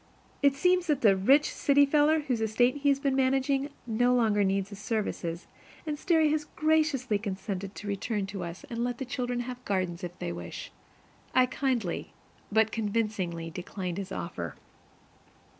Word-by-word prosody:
It 280 -1 +4
seems 360 +4 +2
that 295 -4 +1
the 205 -4 +6
"rich 270 +11 +4
city 285 0 +4
feller" 300 +2 +3
whose 250 -6 -1
estate 245 +5 +2
he 285 0 +2
has 275 -1 +3
been 275 -1 +1
managing 270 +1 +1 0.2
no 245 +2 +2
longer 215 -4 +3
needs 195 0 0
his 200 - -8
services; 200 -6 -3 0.4
and 305 -2 -2
Sterry 320 -1 +3
has 305 -1 0
graciously 300 -8 +2
consented 195 -1 -4
to 205 - -8
return 205 +1 -2
to 195 -1 -5
us 170 +1 -7
and 235 0 -2
let 245 -1 -2
the 265 - -4
children 245 -1 -2
have 250 0 -7
gardens 185 -3 -2
if 175 0 -6
they 85 - -4
wish. 85 0 -7 0.6
I 255 - +6
kindly, 250 -8 -2 0.4
but 220 +1 +3
convincingly, 205 -7 -2
declined 180 +1 -5
his 195 -1 -6
offer. 85 - -5
230 Hz, 165 wpm, -29 LUFS, 195-275 Hz, 0.6 s, the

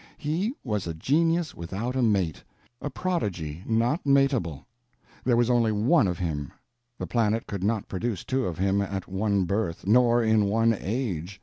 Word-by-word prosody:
He 180 - -1
was 105 -7 -2
a 85 - -4
genius 165 - +1
without 100 +9 -4
a 130 - +1
mate, 95 - +1 0.4
a 145 - -3
prodigy 95 - -3
not 120 +8 +1
matable. 135 - +1 0.6
There 120 -2 +2
was 120 -1 +3
only 115 -2 +3
one 110 - +3
of 90 -2 -2
him; 75 -6 -3 0.5
the - - -4
planet 115 -1 0
could 100 -2 -5
not 105 0 0
produce 100 0 -3
two 130 -1 -1
of 85 -3 -4
him 100 +2 +1
at 100 -1 -4
one 100 +1 0
birth, 95 -3 -2
nor 120 +2 +4
in 110 -2 +3
one 115 +3 +3
age. 95 -4 -3
110 Hz, 170 wpm, -26 LUFS, 95-125 Hz, 0.6 s, nor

